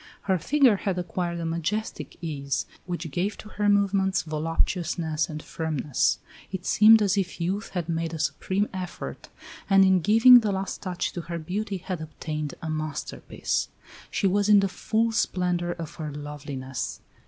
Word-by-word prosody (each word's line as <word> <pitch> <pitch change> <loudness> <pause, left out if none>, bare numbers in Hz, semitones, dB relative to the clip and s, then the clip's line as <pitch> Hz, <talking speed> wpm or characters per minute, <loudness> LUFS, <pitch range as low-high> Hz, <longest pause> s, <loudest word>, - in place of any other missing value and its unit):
Her 190 -2 +1
figure 265 - +4
had 190 -1 -2
acquired 175 -1 -2
a 165 - -3
majestic 170 +7 -3
ease, 140 -4 -2 0.2
which 175 -3 -4
gave 185 +8 -1
to 215 - -11
her 210 -1 0
movements 195 -2 +2
voluptuousness 160 0 -1
and 155 -1 -6
firmness. 155 -4 0 0.3
It 190 -1 -5
seemed 215 0 +7
as 200 0 +2
if 185 -1 -3
youth 190 +6 -2
had 175 -3 -1
made 165 -1 -1
a - - -4
supreme 190 +6 0
effort, 185 -2 -6 0.4
and 195 -1 +7
in 190 -1 +5
giving 225 +6 +8
the 215 -3 -1
last 190 -1 -3
touch 185 -3 -3
to 175 - -4
her 170 0 -5
beauty 195 +5 -3
had 180 -2 -5
obtained 155 -1 -5
a 160 - -3
masterpiece. 155 -2 -3 0.4
She - - -1
was 200 +2 +2
in 205 -1 +7
the 195 - +2
full 225 +4 0
splendor 180 -5 0
of 165 -3 -7
her 155 -3 -4
loveliness. 145 -3 -5
180 Hz, 165 wpm, -26 LUFS, 160-200 Hz, 0.4 s, giving